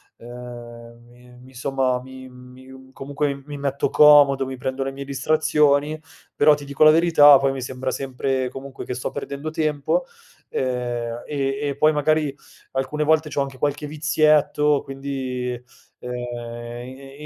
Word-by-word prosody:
ehm, 120 Hz, -1 st, -11 dB
mi 125 Hz, 0 st, -18 dB
mi 130 Hz, +1 st, -16 dB
somma 130 Hz, -1 st, -1 dB
mi 130 Hz, 0 st, -11 dB
mi 130 Hz, +1 st, -15 dB
comunque 140 Hz, 0 st, -3 dB
mi 145 Hz, -1 st, -7 dB
metto 140 Hz, 0 st, -1 dB
comodo, 145 Hz, -2 st, +6 dB
mi 130 Hz, -, -6 dB
prendo 130 Hz, +1 st, -4 dB
le 135 Hz, -, -4 dB
mie 140 Hz, -, -7 dB
distrazioni, 150 Hz, +1 st, +1 dB, 0.3 s
però 150 Hz, +1 st, +5 dB
ti 145 Hz, -1 st, -4 dB
dico 140 Hz, +2 st, +2 dB
la 155 Hz, -, +9 dB
verità, 155 Hz, -3 st, +7 dB
poi 135 Hz, 0 st, +1 dB
mi 135 Hz, -1 st, -5 dB
sembra 130 Hz, +1 st, -4 dB
sempre 130 Hz, -1 st, -2 dB
comunque 135 Hz, +1 st, -8 dB
che 125 Hz, -, -4 dB
sto 125 Hz, -, -4 dB
perdendo 140 Hz, +1 st, -5 dB
tempo, 155 Hz, -, -1 dB, 0.4 s
ehm, 120 Hz, -2 st, -3 dB
e 135 Hz, -1 st, -2 dB
e 140 Hz, -2 st, -2 dB
poi 155 Hz, +2 st, +4 dB
magari 150 Hz, -1 st, +1 dB, 0.4 s
alcune 135 Hz, +3 st, -2 dB
volte 155 Hz, 0 st, +2 dB
c'ho 140 Hz, 0 st, -1 dB
anche 135 Hz, -1 st, -5 dB
qualche 145 Hz, +2 st, -2 dB
vizietto, 150 Hz, -1 st, +2 dB
quindi, 130 Hz, -3 st, -5 dB, 0.4 s
ehm, 125 Hz, 0 st, -6 dB, 0.7 s
i 135 Hz, +3 st, -11 dB
135 Hz, 150 wpm, -22 LUFS, 130-150 Hz, 0.7 s, la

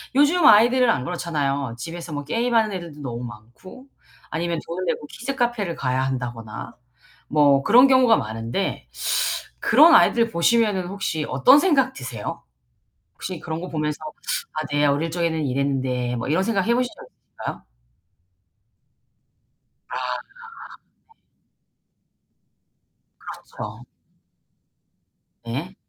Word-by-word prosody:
요즘 300 Hz, +4 st, +4 dB
아이들은 245 Hz, 0 st, +6 dB
안 130 Hz, -, +1 dB
그렇잖아요. 140 Hz, -8 st, -2 dB
집에서 165 Hz, +5 st, -7 dB
뭐 145 Hz, 0 st, -4 dB
게임하는 230 Hz, +4 st, +1 dB
애들도 165 Hz, -5 st, -8 dB
너무 125 Hz, -3 st, -5 dB
많고 120 Hz, -, -12 dB, 0.5 s
아니면 170 Hz, 0 st, -2 dB
돈을 180 Hz, +2 st, -4 dB
내고 150 Hz, -3 st, -2 dB
키즈 275 Hz, +4 st, -5 dB
카페를 240 Hz, -9 st, -1 dB
가야 130 Hz, 0 st, -1 dB
한다거나 120 Hz, -4 st, -5 dB, 0.5 s
뭐 140 Hz, -2 st, +4 dB
그런 250 Hz, +4 st, +7 dB
경우가 255 Hz, -3 st, +5 dB
많은데 115 Hz, -, -3 dB, 0.7 s
그런 325 Hz, +2 st, +6 dB
아이들 230 Hz, -6 st, +4 dB
보시면은 205 Hz, 0 st, +2 dB
혹시 175 Hz, -5 st, -3 dB
어떤 140 Hz, -, +6 dB
생각 275 Hz, -7 st, +2 dB
드세요? 125 Hz, -5 st, -6 dB, 0.7 s
혹시 180 Hz, -3 st, -6 dB
그런 160 Hz, +1 st, -5 dB
거 180 Hz, -, -6 dB
보면서 150 Hz, -1 st, -2 dB, 0.6 s
'아 155 Hz, -, -3 dB
내 145 Hz, 0 st, +2 dB
어릴 145 Hz, +4 st, 0 dB
적에는 165 Hz, -2 st, -1 dB
이랬는데.' 130 Hz, -2 st, -1 dB
뭐 115 Hz, -, -4 dB
이런 165 Hz, +6 st, +2 dB
생각해 225 Hz, +1 st, +1 dB
보신 250 Hz, 0 st, +1 dB
적 -, -, -12 dB
있으신가요? -, -, -9 dB, 2.3 s
아 -, -, -6 dB, 0.3 s
네. 460 Hz, -2 st, -16 dB, 2.1 s
그렇죠. -, -, -9 dB, 1.6 s
네. -, -, -5 dB
170 Hz, 255 characters per minute, -23 LUFS, -, 2.3 s, 그런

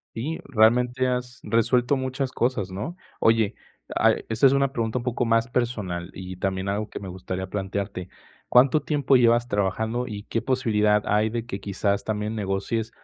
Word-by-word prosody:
Sí, 145 Hz, +8 st, -3 dB
realmente 125 Hz, +1 st, +3 dB
has 125 Hz, 0 st, -2 dB
resuelto 120 Hz, +4 st, +2 dB
muchas 130 Hz, 0 st, -2 dB
cosas, 115 Hz, -6 st, -1 dB
¿no? 130 Hz, -, -5 dB, 0.2 s
Oye, 115 Hz, -2 st, +3 dB, 0.4 s
a -, -, +4 dB, 0.2 s
esta 115 Hz, +5 st, +4 dB
es 130 Hz, -, +6 dB
una 140 Hz, -1 st, +2 dB
pregunta 115 Hz, -1 st, -1 dB
un 120 Hz, -, -7 dB
poco 125 Hz, -1 st, -1 dB
más 115 Hz, +1 st, +2 dB
personal 105 Hz, -9 st, -2 dB
y 95 Hz, 0 st, -7 dB
también 95 Hz, +1 st, -2 dB
algo 105 Hz, +2 st, -1 dB
que -, -, -7 dB
me 95 Hz, -, -8 dB
gustaría 95 Hz, +1 st, -5 dB
plantearte, 95 Hz, -1 st, -4 dB, 0.4 s
¿cuánto 130 Hz, +4 st, +5 dB
tiempo 140 Hz, -3 st, +2 dB
llevas 120 Hz, 0 st, +4 dB
trabajando, 110 Hz, +5 st, -1 dB
y 105 Hz, -3 st, -6 dB
qué 115 Hz, -, -2 dB
posibilidad 105 Hz, -5 st, +2 dB
hay 105 Hz, +1 st, +2 dB
de 115 Hz, 0 st, -3 dB
que 100 Hz, -5 st, -6 dB
quizás 100 Hz, +1 st, -1 dB
también 105 Hz, 0 st, -2 dB
negocies, 105 Hz, +3 st, -2 dB
115 Hz, 170 wpm, -25 LUFS, 100-125 Hz, 0.4 s, es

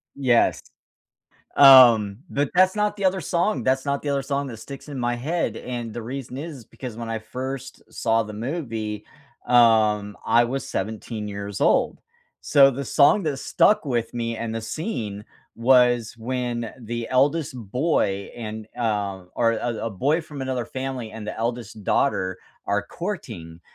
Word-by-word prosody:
Yes. 125 Hz, -4 st, +2 dB, 1.0 s
Um, 120 Hz, -7 st, +8 dB
but 145 Hz, -1 st, 0 dB
that's 185 Hz, +2 st, +4 dB
not 210 Hz, 0 st, 0 dB
the 200 Hz, -, -4 dB
other 190 Hz, 0 st, +2 dB
song 170 Hz, -, 0 dB
that's 130 Hz, +1 st, +1 dB
not 140 Hz, 0 st, -1 dB
the 150 Hz, -, -4 dB
other 140 Hz, -1 st, 0 dB
song 140 Hz, +1 st, -2 dB
that 120 Hz, -4 st, -8 dB
sticks 140 Hz, +5 st, -10 dB
in 140 Hz, -3 st, -6 dB
my 120 Hz, 0 st, 0 dB
head, 160 Hz, +8 st, -2 dB
and 120 Hz, -3 st, -5 dB
the 120 Hz, -, -6 dB
reason 130 Hz, +1 st, -6 dB
is 145 Hz, -5 st, -7 dB
because 125 Hz, 0 st, -9 dB
when 115 Hz, -1 st, -6 dB
I 115 Hz, -, -2 dB
first 130 Hz, +4 st, -6 dB
saw 115 Hz, 0 st, +1 dB
the 105 Hz, -1 st, -8 dB
movie, 110 Hz, -4 st, -4 dB, 0.4 s
um, 110 Hz, -4 st, +4 dB
I 120 Hz, +1 st, +4 dB
was 130 Hz, +3 st, -3 dB
17 110 Hz, +1 st, -4 dB
years 100 Hz, 0 st, -6 dB
old. -, -, +2 dB, 0.4 s
So 140 Hz, -2 st, +6 dB
the 135 Hz, +2 st, -5 dB
song 145 Hz, +10 st, +4 dB
that 150 Hz, -3 st, -1 dB
stuck 210 Hz, +6 st, +3 dB
with 120 Hz, -4 st, -2 dB
me 115 Hz, -1 st, -2 dB
and 115 Hz, 0 st, -4 dB
the 115 Hz, -, -2 dB
scene 110 Hz, -, -4 dB, 0.3 s
was 120 Hz, -1 st, +4 dB
when 120 Hz, -1 st, -3 dB
the 115 Hz, 0 st, -4 dB
eldest 140 Hz, +4 st, +2 dB
boy 110 Hz, -, -1 dB
and, 110 Hz, -2 st, -6 dB
uh, 100 Hz, -5 st, -1 dB
or 115 Hz, -1 st, +2 dB
a 115 Hz, 0 st, -3 dB
a 115 Hz, -, -2 dB
boy 140 Hz, -, +1 dB
from 150 Hz, -3 st, -9 dB
another 130 Hz, -2 st, -2 dB
family 130 Hz, -1 st, -5 dB
and 110 Hz, -1 st, -8 dB
the -, -, -5 dB
eldest 115 Hz, -2 st, -4 dB
daughter 95 Hz, -9 st, +1 dB, 0.3 s
are 100 Hz, 0 st, 0 dB
courting, 110 Hz, -, -6 dB
120 Hz, 165 wpm, -24 LUFS, 110-140 Hz, 1.0 s, Um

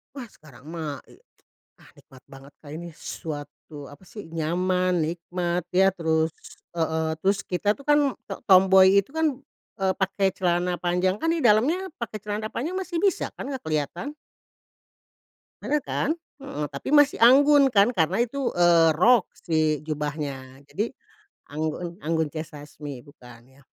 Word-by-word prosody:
Wah 255 Hz, -4 st, -7 dB
sekarang 145 Hz, -3 st, -18 dB
mah, 155 Hz, -5 st, -5 dB
e 370 Hz, -, -19 dB, 0.6 s
ah -, -, -18 dB
nikmat 130 Hz, -4 st, -18 dB
banget 135 Hz, +1 st, -14 dB
Kak 150 Hz, -, -14 dB
ini 170 Hz, 0 st, -8 dB
suatu, 145 Hz, -2 st, -8 dB
apa 145 Hz, +6 st, -15 dB
sih, 200 Hz, -1 st, -11 dB
nyaman, 180 Hz, +3 st, 0 dB
nikmat, 175 Hz, +1 st, -2 dB
ya 190 Hz, +1 st, +5 dB
terus 160 Hz, -3 st, 0 dB, 0.5 s
heeh, 160 Hz, -1 st, -1 dB
terus 195 Hz, +1 st, +3 dB
kita 195 Hz, +3 st, +1 dB
tuh 280 Hz, -, -15 dB
kan 295 Hz, -2 st, +4 dB, 0.2 s
t -, -, -22 dB
tomboy 190 Hz, +1 st, +6 dB
itu 200 Hz, -, -16 dB
kan, 320 Hz, +2 st, 0 dB, 0.5 s
eee, 190 Hz, 0 st, +2 dB
pakai 195 Hz, 0 st, +1 dB
celana 180 Hz, 0 st, 0 dB
panjang 180 Hz, +2 st, 0 dB
kan 325 Hz, +7 st, 0 dB
di 335 Hz, -, -1 dB
dalamnya 285 Hz, -, +3 dB
pakai 230 Hz, -2 st, -5 dB
celana 210 Hz, +1 st, -4 dB
panjang 325 Hz, +10 st, -3 dB
masih 365 Hz, -3 st, -3 dB
bisa 395 Hz, -1 st, 0 dB
kan -, -, -7 dB
nggak 265 Hz, -, -6 dB
kelihatan? 160 Hz, -, -3 dB, 1.5 s
Bener 300 Hz, -, +1 dB
kan? -, -, -2 dB, 0.3 s
Mhm. 150 Hz, -, -4 dB
Tapi 140 Hz, -, -7 dB
masih 290 Hz, -1 st, +5 dB
anggun 280 Hz, +2 st, +6 dB
kan, 205 Hz, +1 st, +4 dB
karena 180 Hz, +4 st, +1 dB
itu, 265 Hz, +2 st, -3 dB
eee, 170 Hz, -2 st, +5 dB
rok 215 Hz, +7 st, +4 dB, 0.2 s
si 155 Hz, -2 st, 0 dB
jubahnya. 145 Hz, -3 st, -5 dB
Jadi, 205 Hz, -, -3 dB, 0.6 s
anggun 160 Hz, +4 st, -4 dB
Anggun 160 Hz, 0 st, 0 dB
C. 155 Hz, +1 st, -4 dB
Sasmi 145 Hz, -2 st, -10 dB
bukan 125 Hz, -5 st, -16 dB, 0.2 s
ya? -, -, -20 dB
175 Hz, 150 wpm, -25 LUFS, 155-220 Hz, 1.5 s, tomboy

